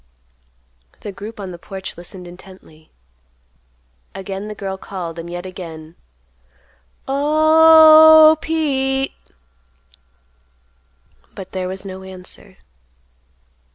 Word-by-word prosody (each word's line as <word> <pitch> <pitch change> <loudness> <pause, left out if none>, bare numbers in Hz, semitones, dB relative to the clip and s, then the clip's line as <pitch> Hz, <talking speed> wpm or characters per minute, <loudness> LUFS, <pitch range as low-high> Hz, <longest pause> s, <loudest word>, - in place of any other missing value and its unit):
The 205 - -7
group 210 +3 -10
on 190 -2 -7
the 175 - -11
porch 190 +2 -9
listened 175 +1 -11
intently. 175 -3 -16 1.3
Again 195 +1 -7
the 210 - -8
girl 195 -1 -5
called, 175 -4 -8
and 165 +1 -8
yet 175 +1 -7
again: 165 -4 -10 1.1
"O—h—h, 315 +2 +6
Pete." 270 -4 -1 2.2
But 190 - -10
there 185 -1 -4
was 190 +1 -7
no 190 -1 -8
answer. 190 +1 -13
195 Hz, 90 wpm, -18 LUFS, 185-280 Hz, 2.2 s, O—h—h